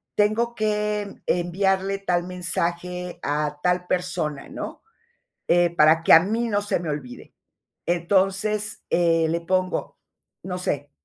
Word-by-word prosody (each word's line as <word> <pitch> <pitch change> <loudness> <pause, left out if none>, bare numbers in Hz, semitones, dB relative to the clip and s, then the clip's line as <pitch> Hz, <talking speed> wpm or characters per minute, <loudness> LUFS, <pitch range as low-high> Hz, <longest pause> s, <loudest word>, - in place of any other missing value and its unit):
tengo 220 +3 +2
que, 210 -1 0
mm, - - -13
enviarle 190 +2 +1
tal 175 -3 0
mensaje 180 0 -3
a 150 0 -1
tal 180 0 +1
persona", 160 -5 -2
¿no?, - - -7 0.7
eh, 175 0 +3
para 160 +1 +5
que - - +6
a 165 - +10
mí 225 +6 -1
no 205 -1 0
se 205 - 0
me 170 - -5
olvide. 140 -5 -6 0.5
Entonces, 195 +5 +1
eh, 165 -2 +3
le 170 +1 0
pongo, 185 +2 -1 0.5
no 180 -1 -4
sé: 145 -5 -2
180 Hz, 135 wpm, -24 LUFS, 170-200 Hz, 0.7 s, a